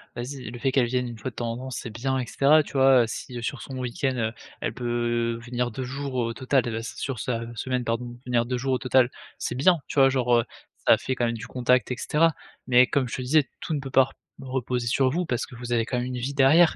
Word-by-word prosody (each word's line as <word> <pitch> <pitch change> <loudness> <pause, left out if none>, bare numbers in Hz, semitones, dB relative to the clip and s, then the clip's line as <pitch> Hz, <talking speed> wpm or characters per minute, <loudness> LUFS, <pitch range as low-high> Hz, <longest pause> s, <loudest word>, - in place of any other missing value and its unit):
Vas-y. 125 -1 -6
Le 120 - -8
fait 135 +2 0
qu'elle 130 -3 +3
vienne 125 0 -1
1 115 -2 -8
fois 130 - -3
de 120 - -19
temps 120 -1 -2
en 115 - -4
temps 130 +1 -6
c'est 120 -2 -5
bien 130 +4 -1
et 130 - -1
cetera 150 +5 +4
tu - - -12
vois? 135 -2 +6
Heu, - - 0
si 120 +1 -6
sur 135 - -3
son 135 - -7
week-end, 130 +1 -1
heu, 110 -1 -1 0.3
elle - - -2
peut 120 -1 -1
venir 125 0 -1
2 125 +3 -5
jours 135 +1 -5
au 115 -2 0
total 130 +1 +1
et 120 - -2
bah 115 - -3
sur 120 +2 -5
sa 115 -2 -2
semaine 125 +2 -2
pardon, 120 +1 -3
venir 120 -1 +1
2 125 0 -1
jours 130 +1 -1
au 130 - +1
total 130 -1 +3 0.3
c'est - - -3
bien, 170 +7 +4
tu - - -1
vois? 135 0 +7
Genre, 125 -2 +2
heu, 115 - -1 0.4
ça - - +7
fait 130 - -2
quand 125 -2 0
même 115 - -2
du 115 - -7
contact 125 -1 +1
et - - 0
cetera. 165 +4 +2 0.3
Mais 125 0 +6
comme 135 -1 +1
je 120 - -4
te - - -4
disais 140 +2 +3
tout 155 - -2
ne - - -1
peut 135 -1 -7
par 135 0 +5
r - - -18 0.3
reposer 125 -2 -2
sur 130 +2 +2
vous 175 +3 -1
parce 120 - -1
que - - -15
vous 120 0 -4
avez 115 -1 +2
quand 125 - -2
même 125 - -1
une 130 -1 -4
vie 130 +3 -3
derrière. 145 +5 +5
125 Hz, 275 wpm, -26 LUFS, 120-135 Hz, 0.4 s, vois